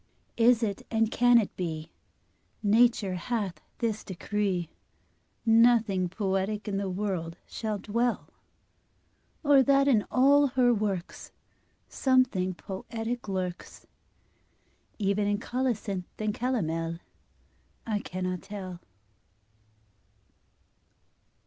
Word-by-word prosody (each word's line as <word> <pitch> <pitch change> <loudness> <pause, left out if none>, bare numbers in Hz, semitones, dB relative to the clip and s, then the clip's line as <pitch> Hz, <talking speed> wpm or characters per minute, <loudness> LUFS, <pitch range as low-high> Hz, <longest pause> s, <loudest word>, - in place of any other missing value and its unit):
Is 235 0 +5
it, 200 -3 -2
and 225 -1 +1
can 245 0 +5
it 220 -4 0
be, 160 -3 -4 0.7
Nature 215 -2 +3
hath 195 0 -3 0.2
this 220 -3 -2
decree, 190 -2 -2 0.8
Nothing 225 -5 +4
poetic 195 +2 -2
in 200 -1 -1
the 195 -1 -2
world 180 -4 -3
shall 215 -2 -3
dwell? 235 +4 -1 1.2
Or 285 -2 +6
that 275 +1 +4
in 225 -7 +4
all 280 +3 +5
her 250 -2 +3
works 200 -5 -3 0.6
Something 250 -9 +1
poetic 225 +5 -5
lurks, 185 -2 -5 1.1
Even 205 0 +1
in 205 0 +1
colocynth 225 -6 -2
and 215 -1 -1
calomel? 165 -10 -1 0.9
I 215 -2 -1
cannot 185 -2 -4
tell. 190 -3 -7
210 Hz, 95 wpm, -28 LUFS, 185-235 Hz, 1.2 s, Or